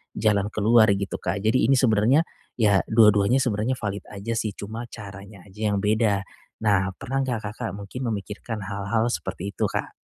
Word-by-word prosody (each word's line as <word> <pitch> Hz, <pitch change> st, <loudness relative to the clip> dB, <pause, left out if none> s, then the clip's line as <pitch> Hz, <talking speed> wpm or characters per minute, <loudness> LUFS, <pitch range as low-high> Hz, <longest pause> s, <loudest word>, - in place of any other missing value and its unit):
jalan 105 Hz, -2 st, +2 dB
keluar 110 Hz, +2 st, +5 dB
gitu 100 Hz, 0 st, -4 dB
Kak. 100 Hz, -, -3 dB
Jadi 110 Hz, +2 st, +3 dB
ini 135 Hz, -, +5 dB
sebenarnya 125 Hz, +4 st, +4 dB, 0.3 s
ya 105 Hz, -4 st, +4 dB
dua-duanya 105 Hz, 0 st, +5 dB
sebenarnya 120 Hz, 0 st, 0 dB
valid 105 Hz, -4 st, -4 dB
aja 100 Hz, +2 st, -5 dB
sih 110 Hz, -3 st, -2 dB
cuma 110 Hz, +4 st, -6 dB
caranya 100 Hz, -3 st, -11 dB
aja 105 Hz, +2 st, -4 dB
yang 100 Hz, 0 st, -1 dB
beda. 105 Hz, -2 st, +2 dB, 0.4 s
Nah 100 Hz, -2 st, +2 dB
pernah 135 Hz, +4 st, -3 dB
nggak 125 Hz, -4 st, -2 dB
Kakak 105 Hz, -, -5 dB
mungkin 105 Hz, +6 st, -6 dB
memikirkan 105 Hz, +1 st, -5 dB
hal-hal 100 Hz, +4 st, -1 dB
seperti 100 Hz, -4 st, -4 dB
itu -, -, 0 dB
Kak? -, -, -4 dB
105 Hz, 165 wpm, -24 LUFS, 100-115 Hz, 0.4 s, keluar